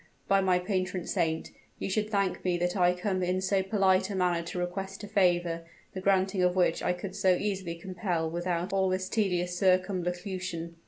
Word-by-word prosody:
By 195 0 +4
my 185 -1 +3
patron 185 -1 -2
saint! 160 -1 -1 0.3
you - - -3
should 210 +2 -1
thank 200 -3 0
me 180 -1 +1
that 175 +2 -1
I 180 -1 +3
come 185 +1 -1
in 180 +1 0
so 190 +1 +1
polite 190 -1 +2
a 200 - -3
manner 180 -2 +1
to 180 - -5
request 190 +3 -4
a - - -5
favor, 175 -4 +2 0.3
the 185 - -5
granting 190 0 +2
of 180 0 +3
which 180 -1 +2
I - - +1
could 180 +2 -5
so 190 -3 +3
easily 190 -3 -2
compel 175 -1 -2
without 175 +2 -2
all 190 -1 +2
this 185 0 -1
tedious 180 -5 0
circumlocution." 180 -2 -1
185 Hz, 190 wpm, -29 LUFS, 175-195 Hz, 0.3 s, By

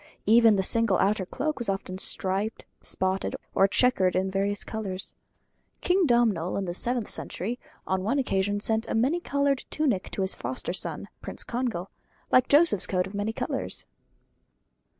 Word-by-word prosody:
Even 225 0 +6
the 190 - +1
single 225 -2 +2
outer 195 -2 +1
cloak 305 +7 -2
was 235 - -1
often 190 -1 -3
striped, 195 +4 -1 0.2
spotted, 190 +1 -2 0.2
or 195 - +5
chequered 195 -4 +3
in 190 +1 0
various 200 +1 -1
colours. 195 -4 -5 0.7
King 365 -1 +3
Domnall, 225 -9 +2
in 200 - -2
the 175 - -3
seventh 240 +3 0
century, 230 +7 -4 0.3
on 190 0 0
one 235 +8 +1
occasion 205 -6 0
sent 220 +2 +1
a - - -2
many 265 +10 +2
coloured 280 -4 0
tunic 260 -12 0
to 195 - -2
his 190 - +4
foster 130 +7 -4
son - - -3
Prince - - -4
Congal: 235 -7 -3 0.4
like 255 0 +5
Joseph's 290 - +4
coat 180 -1 +1
of 190 - -9
many 205 +2 -1
colours. - - -2
205 Hz, 160 wpm, -27 LUFS, 190-245 Hz, 0.7 s, Even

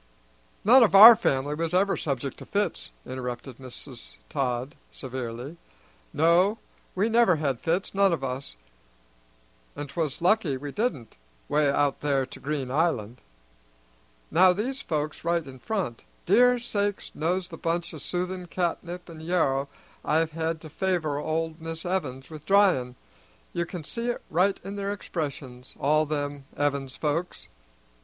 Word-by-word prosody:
"None 250 +5 +8
of 215 -4 +4
our 225 +4 +12
family 140 -9 0
was 165 +3 -2
ever 195 +2 +3
subject 140 -2 -3
to - - -9
fits," - - -1 0.2
interrupted 125 0 -6
Mrs. 110 - -10 0.2
Todd 125 +1 -1 0.2
severely. 130 +3 -6 0.5
"No, 175 +7 +3 0.4
we 195 +4 +2
never 230 -5 +4
had 140 -5 -1
fits, 175 +4 -1
none 195 -1 +4
of 165 -5 -1
us; 130 - -4 1.2
and 145 - -5
'twas 155 -1 -3
lucky 175 -6 +2
we 145 +2 -6
didn't 175 - -3 0.3
'way 145 0 +2
out 140 0 +1
there 140 -2 +1
to 130 - -12
Green 140 -3 -3
Island. 125 -7 0 1.1
Now 180 +3 +6
these 255 +8 -3
folks 155 - -3
right 170 -1 0
in 130 -1 -11
front; 180 - -3 0.2
dear 250 0 +5
sakes 205 -4 -2
knows 175 +4 -1
the 165 - -8
bunches 170 +1 -2
o' - - -7
soothing 180 +1 -3
catnip 175 0 -3
an' 165 -2 -10
yarrow 140 -5 +1 0.3
I've 160 +1 +1
had 160 0 -2
to 155 - -10
favor 165 -6 -1
old 160 +1 -2
Mis' 165 +1 -6
Evins 145 -7 -3
with 155 -1 -10
dryin'! 185 -12 +3 0.6
You 170 -1 -1
can 175 -2 -6
see 230 +10 -4
it 240 - -3
right 185 +4 +2
in 200 +2 -6
their 200 0 -2
expressions, 140 -9 -6
all 155 +2 +2
them 145 -2 -3
Evins 140 -2 -1
folks. 160 +4 -2
160 Hz, 150 wpm, -26 LUFS, 135-185 Hz, 1.2 s, our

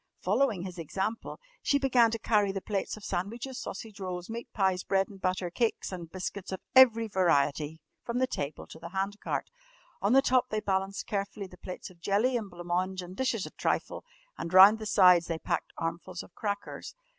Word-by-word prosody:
] - - -49
Following 210 -1 +1
his 185 -2 -7
example, 195 +7 -3 0.2
she 285 - +3
began 255 -4 +4
to 230 - -2
carry 210 -3 +2
the 195 - -3
plates 200 +1 -3
of 215 - -13
sandwiches, 235 +8 -3
sausage 215 0 -7
rolls, 180 +1 -5
meat 235 +1 -6
pies, 190 -3 +1
bread 195 0 +1
and 195 -2 -13
butter, 185 -1 -1
cakes 230 +2 -1
and 175 -3 -6
biscuits 190 +1 -5
of 190 - -3 0.2
every 230 -3 +7
variety 160 -5 +1 0.2
from 235 0 -3
the 260 - +3
table 145 - -4
to 160 - -12
the 170 +1 -8
hand 195 +2 -2
cart. - - -3 0.5
On 200 +4 +2
the 270 +1 +6
top 255 -2 +3
they 215 - -1
balanced 195 -1 -1
carefully 200 0 -3
the 185 - -12
plates 185 +1 -7
of 170 -2 -21
jelly 210 +8 +2
and 220 -4 -2
blanc 175 -1 -10
mange 185 +1 -1
and 180 +1 -9
dishes 240 -4 0
of - - -10
trifle, - - -1 0.4
and 170 - -4
round 195 +4 +9
the 215 - -5
sides 180 -5 +6
they 165 - -2
packed - - -2
armfuls 170 +1 -4
of - - -17
crackers. 205 - -5
195 Hz, 200 wpm, -29 LUFS, 180-220 Hz, 0.5 s, round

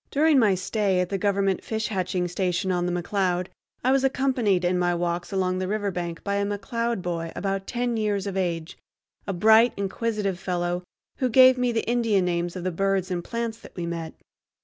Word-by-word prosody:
During 300 0 +4
my 210 -5 +4
stay 190 0 0
at 180 -1 0
the 195 - -2
Government 195 -1 +1
fish 220 -1 -2
hatching 185 -3 -1
station 185 +1 -1
on 175 -1 0
the - - -1
McCloud 180 0 -1 0.3
I 255 - +3
was 270 0 +3
accompanied 255 -9 +1
in 180 0 +1
my 175 0 +1
walks 175 +1 -2
along 185 -1 0
the 185 - -2
riverbank 185 -5 -3
by 200 0 -1
a 200 - +1
McCloud 205 +1 -2
boy 165 -2 -3
about 195 -1 -2
ten 245 -1 -1
years 205 -2 0
of 200 -1 -4
age, 170 -3 -2 0.5
a - - 0
bright, 220 +6 +5
inquisitive 200 -1 -2
fellow, 175 -2 -2 0.4
who 255 - 0
gave 255 +2 +7
me 250 -1 +1
the 230 - -2
Indian 225 -5 +2
names 175 0 -1
of 180 - -5
the 185 - -1
birds 195 +1 0
and 175 -1 -2
plants 230 +1 -4
that - - -14
we 175 - -3
met. 170 -1 -5
195 Hz, 195 wpm, -25 LUFS, 180-220 Hz, 0.5 s, gave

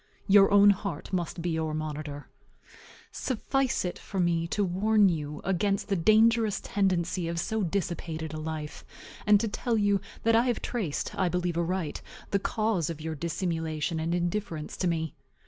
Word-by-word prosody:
Your 195 -1 +7
own 205 0 +7
heart 195 -4 -4
must 175 -1 -2
be 175 - 0
your 160 -1 -1
monitor. 150 -2 -5 0.8
Suffice 260 -1 -1
it 180 - -4
for 195 - -5
me 170 -1 +1
to 205 +4 0
warn 200 +3 +3
you 150 -3 -3
against 195 +2 0
the 200 - +2
dangerous 220 +4 +4
tendency 185 -3 0
of 170 0 -2
so 220 +5 -1
dissipated 165 -4 -3
a 155 - -4
life, 155 -1 -5 0.4
and 210 -1 +7
to 225 - 0
tell 230 +2 -1
you 205 -2 +2 0.2
that 230 0 +4
I 230 +2 +4
have 240 - +1
traced 200 - -3
(I 185 -2 +1
believe 175 0 -1
aright) 170 -1 -2 0.3
the 200 - +2
cause 215 -6 0
of 165 -2 -5
your 160 +1 -4
dissimulation 160 0 -2
and 165 +2 0
indifference 175 -3 -2
to 185 - 0
me. 160 -3 -1
175 Hz, 165 wpm, -28 LUFS, 160-205 Hz, 0.8 s, Your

